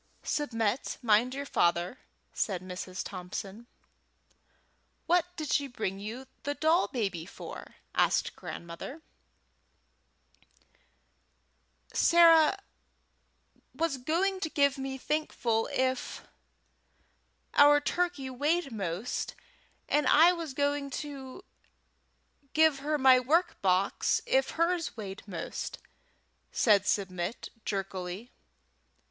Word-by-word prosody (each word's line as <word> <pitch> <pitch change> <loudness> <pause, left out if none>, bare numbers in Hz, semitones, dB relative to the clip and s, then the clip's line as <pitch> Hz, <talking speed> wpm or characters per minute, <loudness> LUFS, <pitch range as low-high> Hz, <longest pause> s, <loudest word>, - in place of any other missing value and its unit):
"Submit, 230 -5 -1
mind 235 +3 +3
your 280 +1 -4
father," 175 0 +1 0.3
said 185 -4 -1
Mrs. 185 0 -5
Thompson. 195 +5 -7 1.4
"What 350 0 +3
did 310 -5 -3
she 285 - +2
bring 215 -6 -4
you 225 +6 -6 0.2
the 285 0 -3
doll 320 +4 +3
baby 195 -9 -3
for?" - - -9 0.2
asked - - +2
Grandmother 170 +8 -7 3.0
Thompson. - - +1
"Sarah 335 +2 +6 1.1
was 325 -5 -1
going 360 +9 0
to 325 - -2
give 280 -2 +2
me 265 0 -4
Thankful 250 -6 -1
if 260 0 -1 1.3
our 290 0 +7
turkey 345 -2 -1
weighed 290 +3 0
most, 195 +1 -3 0.5
and 295 -2 +2
I 330 +4 +7
was 330 -6 -6
going 285 0 0 0.2
to 280 +5 -9 1.1
give 315 -3 +4
her 300 +2 0
my 260 -2 +6
work 330 +8 +1
box 190 +1 +2
if - - +2
hers 335 -4 0
weighed 195 -3 -6
most," 180 -4 -5 0.7
said 205 -3 +3
Submit 185 0 -2 0.2
jerkily. 195 +2 -4
265 Hz, 100 wpm, -30 LUFS, 200-310 Hz, 3.0 s, our